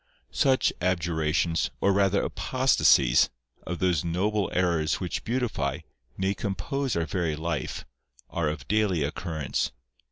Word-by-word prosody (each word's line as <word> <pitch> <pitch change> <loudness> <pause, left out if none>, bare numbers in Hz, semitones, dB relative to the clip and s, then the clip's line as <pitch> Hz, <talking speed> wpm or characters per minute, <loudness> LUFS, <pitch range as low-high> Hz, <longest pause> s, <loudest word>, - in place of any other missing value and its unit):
Such 135 -3 +3
abjurations, 85 -2 +1
or 100 - +3
rather 100 0 +2
apostasies, 75 - +3 0.4
of 90 - -3
those 90 -4 +1
noble 95 +4 0
errors 85 -4 +1
which 90 -2 -3
beautify, 125 0 -1 0.4
nay 95 +1 +1
compose 110 +7 -2
our 85 -1 0
very 85 -4 -1
life, 85 +2 -3 0.4
are 85 -3 -1
of 70 -4 -6
daily 105 -7 +2
occurrence. 80 -1 -2
90 Hz, 120 wpm, -27 LUFS, 80-100 Hz, 0.4 s, Such